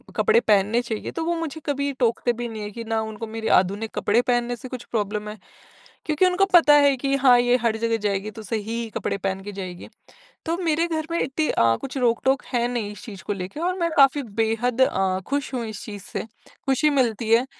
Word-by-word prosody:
कपड़े 450 Hz, +1 st, +4 dB
पहनने 210 Hz, +4 st, +3 dB
चाहिए 225 Hz, -3 st, -5 dB
तो 330 Hz, -, -3 dB
वो 340 Hz, +1 st, 0 dB
मुझे 320 Hz, -1 st, -5 dB
कभी 280 Hz, -1 st, -1 dB
टोकते 240 Hz, 0 st, +1 dB
भी 240 Hz, +1 st, -4 dB
नहीं 220 Hz, -1 st, -7 dB
है, 205 Hz, -, -6 dB
कि 230 Hz, +2 st, -7 dB
ना 225 Hz, 0 st, -1 dB
उनको 220 Hz, 0 st, -6 dB
मेरे 220 Hz, 0 st, -5 dB
आधुनिक 200 Hz, +4 st, -1 dB
कपड़े 230 Hz, +4 st, +2 dB
पहनने 245 Hz, -1 st, 0 dB
से 255 Hz, -, -9 dB
कुछ 255 Hz, -2 st, -6 dB
प्रॉब्लम 210 Hz, -1 st, -2 dB
है, 215 Hz, -, -8 dB, 0.7 s
क्योंकि 310 Hz, +4 st, +3 dB
उनको 365 Hz, +2 st, +3 dB
पता 300 Hz, -4 st, +8 dB
है 285 Hz, -2 st, +5 dB
कि 275 Hz, +2 st, -1 dB
हाँ, 255 Hz, -3 st, +6 dB
ये 245 Hz, +1 st, +3 dB
हर 225 Hz, -1 st, +1 dB
जगह 230 Hz, 0 st, +1 dB
जाएगी 200 Hz, +1 st, -1 dB
तो 220 Hz, -, -9 dB
सही 215 Hz, +1 st, -2 dB, 0.2 s
ही 225 Hz, -, -5 dB
कपड़े -, -, -2 dB
पहन 195 Hz, 0 st, -2 dB
के 205 Hz, -, -6 dB
जाएगी। 185 Hz, -2 st, -7 dB, 0.6 s
तो 335 Hz, +2 st, -1 dB
मेरे 330 Hz, +1 st, +1 dB
घर 315 Hz, -1 st, -3 dB
में 335 Hz, -, 0 dB
इतनी 300 Hz, +4 st, -1 dB
अ, 115 Hz, 0 st, +3 dB
कुछ 270 Hz, 0 st, -5 dB
रोक-टोक 255 Hz, +2 st, +1 dB
है 240 Hz, -1 st, +2 dB
नहीं 230 Hz, -4 st, -3 dB
इस 210 Hz, -, -11 dB
चीज़ 200 Hz, -4 st, -9 dB
को 205 Hz, -, -2 dB
लेके 190 Hz, +8 st, -6 dB
और 365 Hz, +2 st, 0 dB
मैं 335 Hz, -, +1 dB
काफ़ी 275 Hz, 0 st, +5 dB, 0.2 s
बेहद 240 Hz, +3 st, 0 dB
अ, 190 Hz, -6 st, +2 dB
खुश 280 Hz, 0 st, -2 dB
हूँ 240 Hz, -3 st, -2 dB
इस 215 Hz, -2 st, -7 dB
चीज़ 205 Hz, -3 st, -8 dB
से -, -, -5 dB, 0.4 s
खुशी 270 Hz, +3 st, +3 dB
मिलती 235 Hz, -6 st, 0 dB
है, 235 Hz, +3 st, +5 dB
240 Hz, 225 wpm, -23 LUFS, 215-280 Hz, 0.7 s, पता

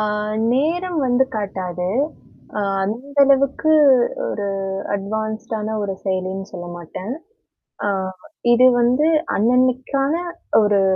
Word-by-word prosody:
ஆ. -, -, +1 dB, 0.5 s
நேரம் 335 Hz, +6 st, 0 dB
வந்து 245 Hz, +1 st, +3 dB
காட்டாது. 185 Hz, -3 st, -3 dB, 0.7 s
அ. -, -, 0 dB, 0.2 s
அந்த 245 Hz, +8 st, -5 dB
அளவுக்கு 275 Hz, +3 st, +3 dB, 0.6 s
ஒரு 205 Hz, -1 st, -3 dB, 0.5 s
அட்வான்ஸ்டான 220 Hz, +2 st, -3 dB
ஒரு 195 Hz, -1 st, -2 dB
செயலின்னு 190 Hz, 0 st, -2 dB
சொல்லமாட்டேன். 175 Hz, +4 st, -7 dB, 0.8 s
ஆ. -, -, +2 dB, 0.7 s
இது 255 Hz, +2 st, +6 dB
வந்து 255 Hz, +6 st, +3 dB, 0.3 s
அன்னன்னைக்கான 255 Hz, -, +1 dB, 0.4 s
ஒரு 205 Hz, -1 st, +3 dB
220 Hz, 95 wpm, -20 LUFS, 195-265 Hz, 0.8 s, இது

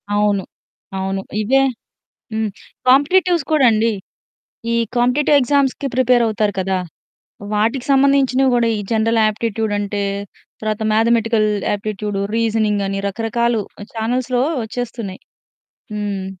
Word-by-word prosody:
అవును. 205 Hz, -2 st, +2 dB, 0.5 s
అవును. 190 Hz, 0 st, -2 dB, 0.2 s
ఇవే 265 Hz, +6 st, +3 dB, 0.7 s
హ్మ్. 220 Hz, -1 st, -1 dB, 0.4 s
కాంపిటీటివ్స్ 335 Hz, +5 st, +4 dB
కూడా 300 Hz, -4 st, +4 dB
అండి. 220 Hz, +1 st, +2 dB, 0.8 s
ఈ -, -, +2 dB, 0.2 s
కాంపిటీటివ్ 265 Hz, +4 st, +3 dB
ఎగ్జామ్స్‌కి 275 Hz, +1 st, +1 dB
ప్రిపేరవుతారు 230 Hz, -5 st, +2 dB
కదా! 190 Hz, 0 st, 0 dB, 0.8 s
వాటికి 230 Hz, +5 st, 0 dB
సంబంధించినవి 270 Hz, -1 st, +3 dB
గూడా, 235 Hz, -1 st, +2 dB
ఈ -, -, -2 dB
జనరల్ 225 Hz, +1 st, +2 dB
ఆప్టిట్యూడ్ 220 Hz, 0 st, -2 dB
అంటే 205 Hz, 0 st, -2 dB, 0.6 s
తర్వాత 215 Hz, 0 st, -2 dB
మ్యాథమెటికల్ 225 Hz, -1 st, +2 dB, 0.3 s
ఆప్టిట్యూడు, 205 Hz, -1 st, -3 dB
రీజనింగని 210 Hz, -3 st, 0 dB
రకరకాలు 225 Hz, +2 st, 0 dB, 0.3 s
ఛానెల్స్‌లో 245 Hz, +2 st, 0 dB, 0.2 s
వచ్చేస్తున్నాయి. 225 Hz, -4 st, -5 dB, 0.7 s
హ్మ్. 200 Hz, -2 st, -3 dB
225 Hz, 100 wpm, -19 LUFS, 210-250 Hz, 0.8 s, కాంపిటీటివ్స్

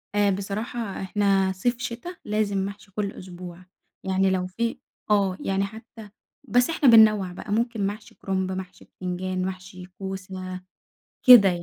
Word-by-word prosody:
آآ، 205 Hz, -1 st, +4 dB
بصراحة 200 Hz, +2 st, -4 dB
إحنا 195 Hz, -1 st, +2 dB
صيف، 240 Hz, +5 st, 0 dB
شتا، 255 Hz, +9 st, -5 dB
لازم 210 Hz, -1 st, 0 dB
محشي 200 Hz, 0 st, -9 dB
كُلّ 200 Hz, 0 st, -2 dB
أسبوع، 180 Hz, -1 st, -10 dB, 0.4 s
يعني 190 Hz, 0 st, +2 dB
لو 185 Hz, -1 st, 0 dB
في 230 Hz, +5 st, -2 dB, 0.3 s
آه، 195 Hz, -3 st, +3 dB
يعني 195 Hz, 0 st, +1 dB
حتّى 220 Hz, 0 st, -11 dB, 0.4 s
بس 245 Hz, +4 st, +4 dB
إحنا 300 Hz, -5 st, +4 dB
بننوّع 215 Hz, -5 st, +6 dB
بقى، 205 Hz, -, -8 dB
ممكن 225 Hz, -2 st, 0 dB
محشي 210 Hz, +1 st, -7 dB
كُرُنب، 190 Hz, -1 st, -2 dB
محشي 185 Hz, -1 st, -7 dB
بتنجان، 185 Hz, 0 st, -3 dB
محشي 185 Hz, 0 st, -7 dB
كوسة، 185 Hz, 0 st, -7 dB, 0.6 s
كده 240 Hz, -7 st, +10 dB
يعني، 175 Hz, -1 st, -2 dB
195 Hz, 145 wpm, -25 LUFS, 185-215 Hz, 0.6 s, كده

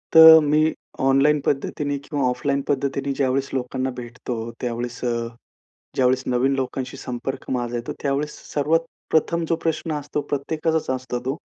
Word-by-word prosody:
तर 160 Hz, 0 st, +11 dB
मी 155 Hz, +2 st, +3 dB, 0.3 s
ऑनलाईन 135 Hz, +3 st, +4 dB
पद्धतीने 145 Hz, +1 st, -1 dB
किंवा 145 Hz, -2 st, -2 dB
ऑफलाईन 140 Hz, +2 st, 0 dB
पद्धतीने 140 Hz, 0 st, -1 dB
ज्यावेळेस 135 Hz, 0 st, +1 dB
लोकांना 130 Hz, 0 st, -2 dB
भेटतो, 120 Hz, 0 st, -6 dB, 0.3 s
त्यावेळेस 120 Hz, 0 st, -3 dB
अ, 120 Hz, -, +1 dB, 0.8 s
ज्यावेळेस 130 Hz, 0 st, +2 dB
नवीन 125 Hz, +2 st, +2 dB
लोकांशी 130 Hz, -1 st, -3 dB
संपर्क 125 Hz, +2 st, -5 dB
माझा 120 Hz, -2 st, -1 dB
येतो, 120 Hz, +1 st, -4 dB
त्यावेळेस 145 Hz, +1 st, -1 dB, 0.2 s
सर्वात 160 Hz, +3 st, +2 dB, 0.3 s
प्रथम 170 Hz, +2 st, +2 dB
जो 165 Hz, -, +3 dB
प्रश्न 160 Hz, 0 st, -1 dB
असतो 145 Hz, +1 st, -3 dB
प्रत्येकाचाच 155 Hz, +3 st, -1 dB
असतो, 125 Hz, -1 st, -4 dB
तो, 135 Hz, +2 st, -1 dB
135 Hz, 140 wpm, -23 LUFS, 125-150 Hz, 0.8 s, तर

